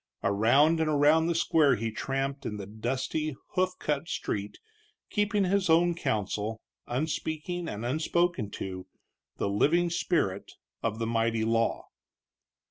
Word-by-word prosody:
Around 125 +11 +4
and 160 -1 +1
around 150 +2 +4
the 170 - 0
square 155 -4 +4
he 115 +1 -3
tramped 135 +3 -3
in 105 - -4
the 100 - -6
dusty, 130 +8 -2
hoof 185 0 0
cut 150 +1 -2
street, 100 0 -3 0.5
keeping 205 -1 +1
his 190 -1 +1
own 170 +2 +5
counsel, 110 - -2 0.3
unspeaking 160 +5 -2
and 105 +3 -5
unspoken 155 - 0
to, 95 -2 -6 0.5
the - - -1
living 170 +13 +2
spirit 100 - -1 0.3
of 110 -1 -1
the 115 - -2
mighty 115 -1 +1
law. 115 0 +1
140 Hz, 130 wpm, -29 LUFS, 110-165 Hz, 0.5 s, own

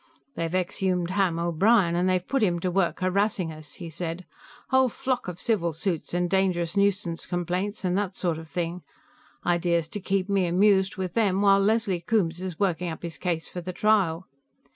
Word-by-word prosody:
"They've 165 -5 -3
exhumed 185 -1 0
Ham 190 -4 +1
O'Brien, 170 +2 +3
and 180 +2 +2
they've 185 -1 0
put 270 -2 0
him 175 -5 +2
to 185 - 0
work 185 -1 0
harassing 185 -2 +1
us," 155 -1 -11
he 175 - -8
said. 170 +2 -5 0.4
"Whole 260 -1 +4
flock 255 -1 -2
of 180 -1 -6
civil 180 -8 0
suits 170 0 -3
and 175 0 0
dangerous 180 -2 +1
nuisance 200 -4 0
complaints 180 +4 -2
and 180 0 +1
that 195 -2 -3
sort 170 -3 -1
of 160 - -10
thing; 175 +1 -3 0.6
idea's 170 -2 +1
to 205 - -4
keep 195 0 -1
me 195 -3 +1
amused 190 +2 +3
with 185 -2 -3
them 200 -3 +2
while 195 -1 +6
Leslie 200 -3 +1
Coombes 175 -3 0
is 185 -3 -5
working 180 -3 0
up 160 - -7
his 170 -1 -6
case 170 -3 -2
for 180 - -6
the 185 +1 -6
trial. 190 -5 +2
185 Hz, 185 wpm, -26 LUFS, 170-200 Hz, 0.6 s, while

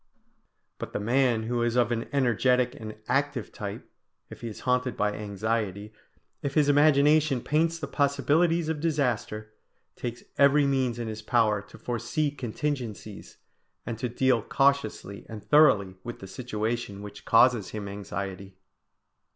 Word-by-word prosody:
But - - -6
the - - -1
man 120 +1 +2
who 120 +1 -1
is 120 0 0
of 120 -2 +3
an 115 -1 -2
energetic 125 -1 +2
and 110 -1 -8
active 135 -2 -1
type, 100 -1 -7 0.4
if - - -10
he 120 - -5
is 110 - -8
haunted 125 0 0
by 105 0 +1
anxiety, 105 0 -3 0.5
if 140 -1 -3
his 150 -2 +4
imagination 145 -1 +4
paints 160 +6 +1
the 160 - -4
possibilities 155 +4 +1
of 160 -1 -2
disaster, 125 -9 -1 0.4
takes 120 0 -6 0.2
every 140 +1 +5
means 130 -3 +1
in 120 -1 -4
his 110 0 -5
power 110 -2 +2
to - - -15
foresee 125 +5 -2
contingencies, 120 -5 -5 0.5
and 115 -1 -5
to 125 0 -2
deal 125 0 +2
cautiously 135 -6 0
and 110 -3 -8
thoroughly 130 -11 +4
with 120 - -6
the - - -10
situation 110 -1 -4
which 105 0 -10
causes 115 -3 +4
him 105 -2 -6
anxiety. 100 -1 -6
120 Hz, 145 wpm, -27 LUFS, 105-140 Hz, 0.5 s, every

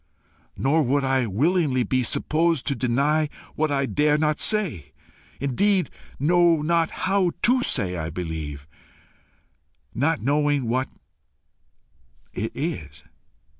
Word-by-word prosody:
Nor 150 +4 +2
would 140 +1 +1
I 130 -2 +1
willingly 135 - +1
be 130 +4 0
supposed 160 +4 0
to 140 - 0
deny 140 +6 +1 0.2
what 155 0 0
I 140 -1 +1
dare 150 +2 +2
not 150 0 0
say 145 - +1 0.5
indeed 185 +8 +1 0.3
know 170 0 +3
not 165 0 +1 0.2
how 190 -2 +1
to 250 +2 +4
say 95 - 0
I 80 -2 -4
believe, 80 -4 -6 1.3
not 150 +6 0
knowing 145 0 +1
what 130 +3 -1 1.4
it 110 +4 -3
is. 80 - -5
145 Hz, 115 wpm, -24 LUFS, 120-165 Hz, 1.4 s, to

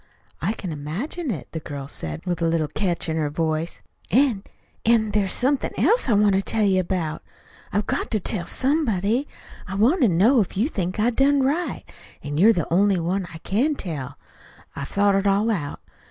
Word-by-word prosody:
"I 195 +7 0
can 190 -6 -6
imagine 190 - -4
it." 170 - -4
The 160 - -4
girl 140 -3 -7
said 80 - -6
it - - -29
with 175 -1 -2
a 165 - +2
little 165 -2 +1
catch 175 +2 -1
in 160 0 -1
her 150 -2 0
voice. 160 +1 -2 0.3
"An' 240 -3 +3 0.4
an' 220 -2 +3
there's 200 -2 +1
somethin' 265 +2 +1
else 470 - +3
I - - +4
want 205 -1 +4
to 190 - +3
tell 215 +2 0
you 190 -2 +3
about. 170 -4 -2 0.5
I've 205 +1 0
got - - -2
to 215 - +1
tell 175 -2 -1
somebody. 255 - 0 0.4
I 190 - -5
want 245 - +3
to 245 - +6
know 215 +8 +4
if 190 - -4
you 225 +7 +2
think 185 - -3
I 230 +3 +3
done 275 +2 +3
right. 305 +7 -1 0.4
An' 145 +1 -3
you're 215 +6 +7
the 170 -6 -1
only 195 0 +3
one 180 +2 -1
I 165 - -8
can 265 +10 +1
tell. 145 - -5 0.6
I've 140 - -5
thought 200 0 +2
it 195 +1 +1
all 205 +3 +2
out. 150 -9 -3
195 Hz, 200 wpm, -23 LUFS, 165-230 Hz, 0.6 s, you're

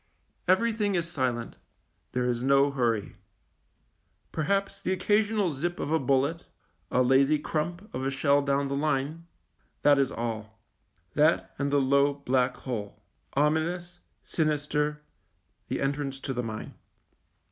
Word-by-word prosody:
Everything 210 +1 +2
is 170 -1 0
silent; 125 -5 -2 0.6
there 125 0 0
is 120 -1 0
no 140 +2 +4
hurry. 115 -6 -1 1.1
Perhaps 195 +4 -1
the - - -1
occasional 205 -1 +2
zip 175 +6 -3
of 145 - -3
a 160 - +3
bullet, 140 +5 +1 0.4
a 130 - +3
lazy 135 +4 +4
crump 170 +6 -3
of 130 - -3
a 135 - +1
shell 140 +1 +3
down 140 0 +1
the 140 - -2
line; 150 +3 -1 0.6
that 145 -1 +6
is 135 - +2
all, 110 -1 -5 0.5
that 155 +2 +2
and 140 0 0
the 145 - +4
low, 140 +1 +3
black 130 -2 +1
hole 110 -6 -5 0.2
— 80 +2 -41
ominous, 175 +3 -1 0.2
sinister, 150 -1 -1 0.6
the - - -2
en 135 +1 +1
trance 140 -2 -4
to 135 - -3
the 125 - -1
mine. 110 -2 -6
140 Hz, 140 wpm, -28 LUFS, 130-165 Hz, 1.1 s, that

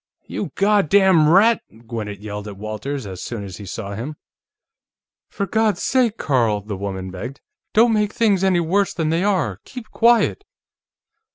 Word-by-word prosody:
"You - - -4
goddam 195 -5 +4
rat!" 215 +7 +5 0.2
Gwinnett 105 -3 -5
yelled 105 0 -6
at 100 -2 -8
Walters, 110 +6 -5
as 95 -2 -7
soon 115 -4 -5
as 95 -2 -8
he 100 - -9
saw 100 +1 -5
him. 125 +9 -5 1.1
"For 200 - -3
God's 220 +2 0
sake, 245 -4 +2
Carl," 115 -7 +1
the 105 0 -6
woman 95 -1 -5
begged. 120 +9 -7 0.4
"Don't 225 +1 +5
make 210 -1 +1
things 205 -5 +2
any 190 -2 +3
worse 190 +4 +1
than 160 -2 0
they 165 +3 +1
are. 165 - 0
Keep 250 -4 -10
quiet!" 235 - +3
155 Hz, 160 wpm, -21 LUFS, -, 1.1 s, rat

